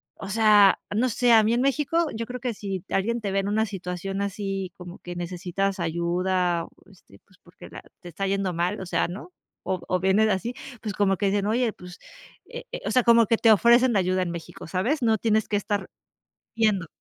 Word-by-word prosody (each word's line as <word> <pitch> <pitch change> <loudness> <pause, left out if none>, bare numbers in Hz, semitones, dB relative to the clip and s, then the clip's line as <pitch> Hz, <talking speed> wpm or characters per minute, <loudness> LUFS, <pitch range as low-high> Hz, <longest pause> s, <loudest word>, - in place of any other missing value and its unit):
o 195 - -8
sea, 210 -2 +5 0.2
no 250 +3 +2
sé, 240 +2 +2
a 220 -1 +7
mí 225 +2 +2
en 240 - +1
México, 295 +4 +1
yo 230 +1 -4
creo 250 +2 -7
que 245 -2 -3
si 195 -3 -5
alguien 230 +4 -1
te 200 -2 -3
ve 195 - +1
en 195 - -2
una 220 +2 +1
situación 195 0 -5
así 195 -2 -3
como 180 0 -10
que 175 0 -8
necesitas 180 +2 -3
ayuda, 175 +1 0 0.2
este, 170 - -20
pues, 190 -2 -27
porque 175 0 -14
la - - -10 0.2
te 175 - -10
está 195 +4 -4
yendo 195 -2 -1
mal, 175 +5 -1
o 190 - -6
sea, 175 - 0
¿no? 200 - -9 0.3
O 185 - -2
o 185 - 0
vienes 195 +4 +3
así, 220 +5 -1 0.3
pues 210 -3 -4
como 195 -2 +2
que 200 - 0
dicen, 200 0 0
oye, 230 +1 +1
pues, 180 0 -12 0.5
eh 485 0 -8
eh, - - -6
o - - -1
sea, 255 - +3
como 235 -1 +5
que 230 - +2
te 225 - +5
ofrecen 235 +2 +5
ayuda 185 0 +1
en 170 - -4
México, 170 -1 -8
¿sabes?, 235 - -1
no 225 -1 +3
tienes 220 0 +1
que 205 - 0
estar 205 -1 -3 0.7
yendo. 210 -7 +1
200 Hz, 215 wpm, -25 LUFS, 185-225 Hz, 0.7 s, a